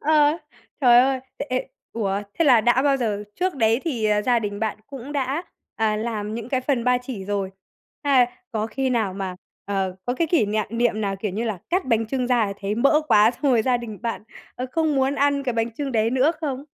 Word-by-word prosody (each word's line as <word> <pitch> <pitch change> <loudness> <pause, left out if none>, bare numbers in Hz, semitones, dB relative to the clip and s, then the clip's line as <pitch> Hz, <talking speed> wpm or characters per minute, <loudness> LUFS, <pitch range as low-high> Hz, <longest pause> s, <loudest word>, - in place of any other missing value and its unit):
Ờ, 300 +1 +3 0.4
trời 240 -2 +7
ơi, 260 0 +3 0.2
ê, 285 - -4
ê, - - -7 0.2
ủa, 200 -2 -1 0.2
thế 335 - +4
là 250 -6 +6
đã 240 +3 +3
bao 280 -1 +3
giờ 210 -4 -2
trước 365 -2 -1
đấy 225 -1 +2
thì, 250 -10 -2
à, 210 0 +2
gia 245 0 +3
đình 205 -1 -4
bạn 220 -1 -1
cũng 275 +1 -8
đã, 280 +4 -1 0.3
à, 215 -1 +1
làm 215 -1 -3
những 230 0 -5
cái 260 0 0
phần 255 -3 0
ba 250 0 +3
chỉ 245 -6 -7
rồi? 200 -1 -2 0.5
Hay 260 -4 +5 0.3
có 220 -1 -1
khi 265 +2 -2
nào 220 -6 0
mà, 190 -2 -4 0.3
ờ, 190 -2 -2
có 245 - -1
cái 330 +5 0
kỷ 315 - +2
niệm 215 +1 0
niệm 230 -2 +1
nào, 195 -2 -1
kiểu 205 0 -3
như 220 +5 -2
là, 215 -5 -2
cắt 365 +2 +1
bánh 225 -3 +1
chưng 255 +1 -1
ra 240 -3 +2
thì 200 - -3
thấy 200 +1 -2
mỡ 275 +6 +4
quá 210 +2 +6
xong 255 - -16
rồi 225 -2 +3
gia 250 0 +2
đình 225 -4 -7
bạn, 230 -3 -3 0.3
ờ, 255 - -4
không 315 -2 +1
muốn 270 +1 +2
ăn 285 0 +2
cái 250 -3 -1
bánh 230 0 -1
chưng 270 +3 -4
đấy 225 0 +2
nữa 265 +5 +3
không? 280 -3 -3
240 Hz, 235 wpm, -23 LUFS, 215-270 Hz, 0.5 s, trời